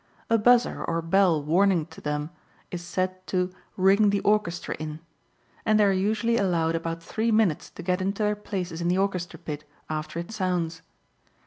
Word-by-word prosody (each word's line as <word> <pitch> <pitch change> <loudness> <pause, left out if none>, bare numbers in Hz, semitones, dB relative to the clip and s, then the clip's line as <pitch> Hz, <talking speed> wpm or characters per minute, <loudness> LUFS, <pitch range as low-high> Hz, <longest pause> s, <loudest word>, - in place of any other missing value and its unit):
A 230 - +6
buzzer 245 +2 +4
or 165 0 -1
bell 165 -3 +3
warning 175 +1 +3
to - - -12
them 150 +1 -2 0.4
is 175 - -4
said 185 +1 -2
to 180 -1 0 0.2
"ring 195 +3 +5
the 200 0 +2
orchestra 210 -5 +1
in," 155 0 -5 0.6
and 215 -1 +3
they - - +6
are 200 - +4
usually 215 +4 +1
allowed 170 -5 +1
about 165 0 -3
three 220 +6 -1
minutes 215 -8 +2
to - - -10
get 180 +1 0
into 195 +3 -1
their 210 0 +2
places 180 -5 -4
in 170 - 0
the 180 +1 +2
orchestra 190 -3 -1
pit 150 -3 -6 0.3
after 155 +1 -4
it 170 +4 -5
sounds. 180 -5 -1
185 Hz, 180 wpm, -26 LUFS, 165-205 Hz, 0.6 s, A